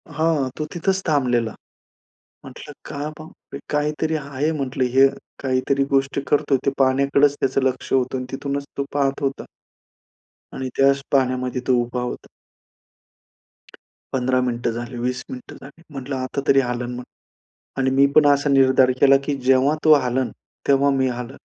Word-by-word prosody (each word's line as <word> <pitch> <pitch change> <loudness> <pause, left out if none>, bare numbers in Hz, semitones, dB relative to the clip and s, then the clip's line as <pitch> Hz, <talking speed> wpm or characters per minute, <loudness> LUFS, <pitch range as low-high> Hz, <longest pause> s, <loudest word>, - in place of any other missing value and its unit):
हां, 155 -4 +1
तो 155 - -2
तिथंच 190 +2 0
थांबलेला. 125 -7 +1 0.9
म्हटलं - - -11
का - - -7 0.2
मग 155 +1 -11
काहीतरी 150 +2 -1
आहे, 145 +1 -2
म्हटलं 135 -4 -2
हे 135 - +8 0.4
काहीतरी 135 +1 +1
गोष्ट 135 0 +1
करतोय. 140 -1 +2
ते 140 - +3
पाण्याकडेच 140 +2 +3
त्याचं 135 +1 +1
लक्ष 130 -1 -2
होतं 130 0 +1
आणि 125 - -4
तिथूनच 140 +1 -3
तो 140 - -1
पाहत 140 -1 0
होता 135 0 -2 1.1
आणि 130 -1 -4
त्याच 140 0 +4
पाण्यामध्ये 130 -2 0
तो 130 - +4
उभा 120 +1 -4
होता. 125 - -5 1.9
15 130 0 +1
मिनिटं 120 -1 -1
झाले, 120 +2 -6
20 125 +1 -2
मिनिटं 255 -2 -9
झाली, 140 +4 -14
म्हटलं 135 0 -5
आता 130 +1 -3
तरी 135 - +5
हलेल 125 0 -4
मग. 125 - -6 0.8
आणि 130 0 +1
मी 140 +1 +6
पण 150 - +7
असा 140 +1 +1
निर्धार 130 -1 +4
केला, 135 0 +7
की 145 -1 -1
जेव्हा 135 +3 +4
तो 155 -1 +8
हलेल, 125 +1 -1 0.4
तेव्हा 140 0 +4
मी 130 - +2
हलेन. 125 +2 -6
135 Hz, 150 wpm, -21 LUFS, 130-140 Hz, 1.9 s, हे